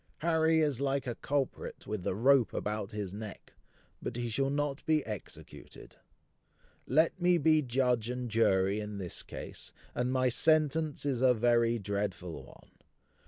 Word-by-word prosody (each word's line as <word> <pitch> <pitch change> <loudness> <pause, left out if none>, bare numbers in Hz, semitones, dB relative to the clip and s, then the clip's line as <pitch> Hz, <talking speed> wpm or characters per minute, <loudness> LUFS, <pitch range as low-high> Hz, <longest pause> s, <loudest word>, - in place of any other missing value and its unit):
Harry 160 0 +3
is 145 -4 0
like 140 -1 0
a 120 - -2
culprit 140 +2 -3
with 105 -1 -4
the 90 - -2
rope 130 +2 +3
about 105 -1 -3
his 105 -3 -4
neck; 105 -1 -9 0.5
but - - -4
he 120 -1 -2
shall 135 +4 0
not 145 0 -2
be 155 -2 +2
executed. 105 -3 -10 0.9
Let 160 +6 +2
me 175 0 +4
be 155 0 +4
judge 125 -3 0
and 125 0 -3
jury 100 -3 +2
in 105 -1 -5
this 90 -3 -5
case; - - -9 0.2
and 125 +1 -1
my 130 0 +2
sentence 155 +2 +2
is 130 -4 0
a 130 -1 +5
very 120 0 +3
dreadful 100 -4 -3
one. - - -17
125 Hz, 155 wpm, -31 LUFS, 105-145 Hz, 0.9 s, a